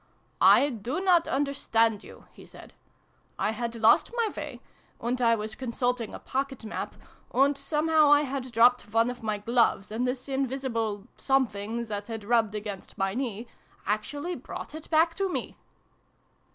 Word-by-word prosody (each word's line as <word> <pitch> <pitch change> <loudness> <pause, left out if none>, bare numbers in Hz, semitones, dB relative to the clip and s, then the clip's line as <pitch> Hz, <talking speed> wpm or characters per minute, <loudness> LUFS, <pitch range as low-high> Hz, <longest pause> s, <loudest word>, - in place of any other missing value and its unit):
" - - -40 0.2
I 285 - +2
do 235 - -3
not 360 -3 +3
understand 230 -6 +1
you," - - -14
he - - -15
said. - - -13 0.3
" - - -39
I - - +1
had 235 +1 -4
lost 225 -1 +4
my 460 -2 +1
way, 290 -5 -6 0.4
and 245 +2 -2
I 230 -1 +4
was 215 0 -5
consulting 245 -1 -2
a - - -5
pocket 270 -3 -4
map, 215 - -5 0.4
and 275 +3 +3
somehow 305 +2 +2
I 290 0 +7
had 265 -3 -4
dropped 240 -1 +4
one 230 +2 +3
of 245 - -10
my 215 -2 -1
gloves, 225 -2 +1
and 240 +4 -1
this 250 +1 -3
invisible 255 -6 -2
Something, 235 -4 0
that 205 -2 -5
had 225 -2 -6
rubbed 220 -1 +2
against 205 -2 -6
my 195 0 0
knee, 235 -2 -3 0.4
actually 285 - -2
brought - - -8
it 315 0 -9
back 330 +1 +4
to 390 +3 -1
me - - -3
245 Hz, 165 wpm, -27 LUFS, 220-275 Hz, 0.4 s, I